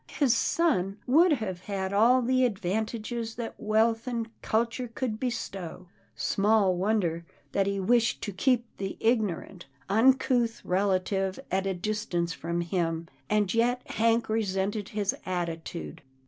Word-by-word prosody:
His 275 -6 +4
son 200 - +1
would 320 +6 +5
have 205 -9 -3
had 195 -1 -3
all 240 +5 +5
the 255 +1 +2
advantages 220 +2 -2
that 235 -1 -5
wealth 225 +2 +2
and 230 -2 -2
culture 235 +3 0
could 230 -2 -3
bestow. 195 -8 -4 0.3
Small 200 -2 +2
wonder, 180 -4 0 0.3
that 195 -1 +1
he 200 0 -1
wished 230 +4 +2
to 205 - -3
keep 240 +5 +2
the 195 -1 -4
ignorant, 210 - -1 0.2
uncouth 240 +1 +3
relative 190 +1 0
at 190 +1 0
a 190 - -1
distance 175 -3 -2
from 170 +3 -3
him, 165 -1 -2 0.2
and 210 -3 +2
yet 245 +2 +1
Hank 230 0 +2
resented 205 -1 -1
his 205 -2 -1
attitude. 170 -2 -4
210 Hz, 135 wpm, -28 LUFS, 190-230 Hz, 0.3 s, would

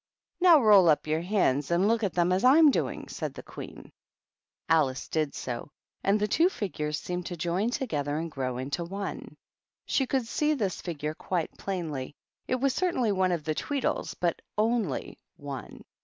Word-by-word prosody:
"Now, 350 -4 +7
roll 205 -7 +7
up 150 - +3
your 155 +1 0
hands, 170 -8 +1
and 175 +3 +3
look 230 +1 +2
at 195 - 0
them 175 0 +2
as 185 +1 +1
I'm 290 +4 +7
doing," - - -2
said - - -5
the - - -8
Queen. - - -10 0.8
Alice 145 -5 +2
did 155 -3 -1
so, 125 +2 -5 0.3
and 200 +2 +3
the 210 - +1
two 330 - +3
figures 155 - -3
seemed 180 +2 -4
to 175 - -5
join 175 +7 0
together 150 - -2
and 165 +1 -4
grow 130 -3 -3
into 140 +7 -3
one. 195 +4 -6 0.5
She 265 - +1
could 260 -2 0
see 300 +6 +1
this 200 - -2
figure 155 -3 -4
quite 170 0 -3
plainly; 155 -8 -4 0.3
it 255 - +1
was 265 +1 +1
certainly 260 - +1
one 185 -2 +2
of 170 -3 -1
the 155 0 -1
Tweedles, 275 - -2
but 170 -2 0 0.2
only 215 - 0 0.2
one. 140 -2 -8
180 Hz, 175 wpm, -28 LUFS, 155-225 Hz, 0.8 s, Now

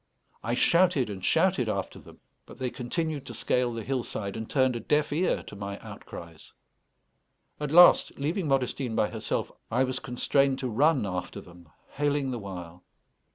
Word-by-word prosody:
I 120 +2 -1
shouted 170 - +3
and 95 -2 -7
shouted - - +2
after - - -3
them, - - -16 0.3
but - - -12
they 130 -2 -3
continued 150 +3 -3
to 120 - -7
scale 125 +2 0
the 115 -1 -5
hillside, 115 -5 -3
and 110 0 -6
turned 130 -3 +2
a - - -2
deaf 150 +6 +1
ear 175 +5 +1
to - - -10
my 100 0 -5
outcries. 85 -2 -11 1.1
At 150 -1 -2
last, 175 +2 +7
leaving 160 +5 -1
Modestine 130 -3 0
by 105 - +1
herself, 110 -2 -2 0.2
I 125 +4 +2
was 130 0 -2
constrained 135 +1 +1
to 130 -2 -3
run 140 +2 +3
after 90 -2 -4
them, 85 -2 -15 0.2
hailing 145 -2 0
the 120 - -3
while. 90 -3 -8
125 Hz, 165 wpm, -28 LUFS, 105-145 Hz, 1.1 s, last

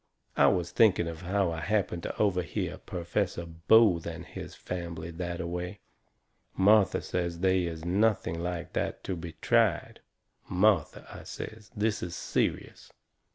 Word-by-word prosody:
I - - +5
was 90 -1 +1
thinking 95 -6 +4
of 85 0 -6
how 95 0 0
I 80 - -4
happened 100 -2 0
to - - -5
overhear 90 -5 -1
Perfessor 85 0 -2
Booth 85 +2 +4
and 85 +1 -6
his - - -8
fambly 85 -2 -5
that 85 -1 -3
a 90 - -3
way. 90 +3 -4 0.8
Martha 100 +1 +4
says 85 -1 -2
they 95 -1 +3
is 80 -1 -5
nothing 95 -3 +1
like 90 0 -4
that - - -2
to 95 - -3
be 85 -1 -7
tried. 110 +3 +1 0.5
"Martha," 95 -3 +2
I - - -9
says, 110 -1 -8
"this 110 +1 0
is 90 0 -4
serious. - - -2
90 Hz, 150 wpm, -29 LUFS, 85-100 Hz, 0.8 s, I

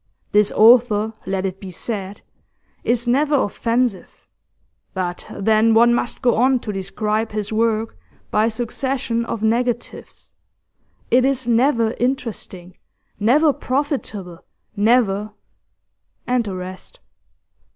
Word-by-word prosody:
This 210 0 +3
author, 220 -1 +5
let 190 0 -1
it 190 0 -4
be 195 - -8
said, 195 +1 -5 0.6
is 240 0 0
never 290 +4 +2
offensive, 235 -3 -1 0.7
but 180 -1 -3
then 220 +2 +2
one 235 +1 +5
must 240 0 -2
go 240 -3 +3
on 260 +3 +4
to 210 - -5
describe 210 +3 -2
his 210 0 -3
work 225 0 0 0.4
by 210 +1 +3
a - - +2
succession 240 +1 -2
of 225 -2 -4
negatives; 240 +2 -2 0.8
it 250 +1 +5
is 265 -2 0
never 235 -1 +2
interesting, 225 -8 -4 0.4
never 285 +8 +4
profitable, 250 - -3 0.3
never 210 -1 +2 0.5
' - - -51
and 245 -2 0
the 195 -2 -4
rest. 185 - -9
225 Hz, 120 wpm, -20 LUFS, 205-245 Hz, 0.8 s, author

